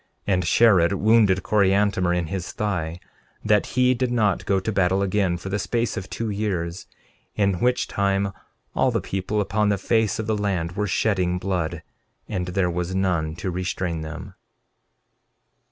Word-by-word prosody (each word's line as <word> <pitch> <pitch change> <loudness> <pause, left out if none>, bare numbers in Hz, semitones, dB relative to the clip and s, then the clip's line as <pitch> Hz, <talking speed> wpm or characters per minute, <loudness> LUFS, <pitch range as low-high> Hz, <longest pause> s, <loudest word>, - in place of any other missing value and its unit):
13:31 100 - +3
And 90 -2 0
Shared 100 -4 +5
wounded 100 -2 +3
Coriantumr 100 -2 +2
in 85 - -1
his 95 +3 -5
thigh, 90 -5 -2 0.5
that - - +3
he 125 0 +5
did 125 0 -1
not 105 -6 +1
go 95 -1 +2
to 105 +4 -3
battle 95 -1 +2
again 95 -2 +1
for 95 +3 -7
the 105 +2 -1
space 115 +3 -1
of 95 - -6
two 115 -2 -3
years, 95 -5 -3 0.5
in 100 -4 +1
which 125 +3 +1
time 100 0 0 0.4
all - - +3
the - - 0
people 95 +2 -2
upon 105 +1 +1
the 100 - +2
face 110 +2 +1
of 110 - -3
the 110 0 0
land 95 -5 -1
were 105 +3 -2
shedding 90 -2 +1
blood, 90 -3 -2 0.4
and 90 -3 -3
there 90 0 0
was 90 +2 -3
none 85 -5 0
to 95 +2 -4
restrain 90 -2 -2
them. 85 +5 -7
95 Hz, 170 wpm, -23 LUFS, 90-105 Hz, 0.5 s, Shared